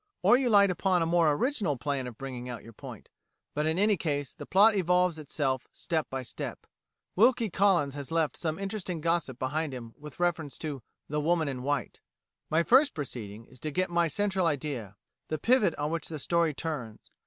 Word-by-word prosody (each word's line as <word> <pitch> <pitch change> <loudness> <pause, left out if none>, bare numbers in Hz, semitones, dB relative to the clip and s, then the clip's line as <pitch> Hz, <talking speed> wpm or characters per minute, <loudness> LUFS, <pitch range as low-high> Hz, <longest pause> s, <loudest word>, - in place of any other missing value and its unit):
Or - - +7
you 255 -1 +2
light 200 -3 +6
upon 180 -1 +1
a - - +1
more 165 -2 +3
original 200 - 0
plan 140 -1 -2
of 120 -3 -9
bringing 125 -2 -6
out 120 - -6
your 115 - -12
point; - - -10 0.4
but 150 +1 0
in 160 +2 0
any 205 +1 +3
case, 145 -5 -2
the - - -10
plot 205 +4 +6
evolves 180 -2 +2
itself 135 -3 -2
step 160 -4 -2
by 130 -1 -4
step. 115 - -6 0.5
Wilkie 230 0 +4
Collins 175 -8 +3
has 140 -1 -7
left 165 -2 +1
some 160 -2 -2
interesting 195 -3 -4
gossip 165 -5 0
behind 145 +2 -2
him 115 -2 -8
with 150 +1 -11
reference 165 -5 -1
to 145 -5 -5 0.3
"The 150 +1 -1
Woman 160 0 +2
in 130 -2 -3
White": 140 0 -2 0.5
"My 160 +2 +3
first 270 - +5
proceeding 115 -7 -6
is 130 +1 -18
to 155 - -3
get 185 +4 -1
my 170 -1 +3
central 190 +1 0
idea 135 -9 -3 0.3
the 155 - -2
pivot 220 - +3
on 150 +1 -2
which 165 -2 -3
the 160 - -5
story 165 +1 +1
turns. 130 -9 -5
155 Hz, 195 wpm, -29 LUFS, 140-180 Hz, 0.5 s, Or